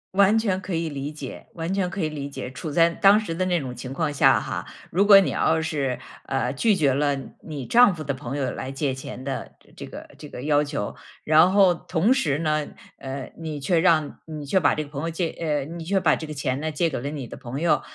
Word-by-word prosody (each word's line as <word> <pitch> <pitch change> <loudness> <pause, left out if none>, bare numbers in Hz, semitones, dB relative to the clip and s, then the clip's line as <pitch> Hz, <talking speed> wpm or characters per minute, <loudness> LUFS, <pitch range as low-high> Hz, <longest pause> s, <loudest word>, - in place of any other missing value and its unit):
完 200 +3 +5
全 195 -4 0
可 190 -1 -5
以 165 0 -1
理 145 -1 -4
解， 145 -4 -8
完 165 +1 -3
全 190 -2 0
可 200 - -6
以 155 - +1
理 145 -2 -5
解。 140 - -6
处 150 +4 -6
在 165 +2 +5
当 195 +5 +5
时 170 -7 -4
的 185 - 0
那 180 -2 +1
种 130 -4 -6
情 130 +1 -7
况 150 +1 -1
下 140 - +5
哈， - - -4 0.2
如 195 +4 +2
果 200 -1 +9
你 195 - +1
要 160 0 +1
是， 140 -6 -2 0.3
呃， 135 0 -1
拒 210 - +2
绝 145 -8 +2
了 145 0 +1 0.2
你 145 -5 -6
丈 240 - +6
夫 165 - -8
的 140 -2 -2
朋 130 +1 -5
友 135 -3 -1
来 130 +1 -5
借 135 0 -1
钱 130 -1 -8
的 135 0 -5 0.2
这 - - -8
个 - - -10
这 150 - -10
个 125 - -8
要 145 0 +3
求， 145 -8 -4 0.3
然 160 +4 +6
后 195 -2 +5
同 180 +7 +1
时 150 - 0
呢， 155 -2 0 0.3
呃， 135 0 -6
你 155 -3 -5
却 165 +5 +1
让 160 -4 +2
你 155 -2 -7
却 140 - +1
把 155 -6 +4
这 155 - -3
个 - - -14
朋 140 -1 -5
友 165 - -2
借 160 -4 -2
你 165 - -6
却 195 +4 +1
把 160 -5 +3
这 160 - -6
个 155 - -6
钱 140 -1 -2
呢 155 0 -2
借 165 +3 +1
给 150 - -4
了 140 - -3
你 145 -4 -6
的 - - -9
朋 130 +2 -6
友， 155 -4 +2
155 Hz, 265 characters per minute, -24 LUFS, 140-175 Hz, 0.3 s, 果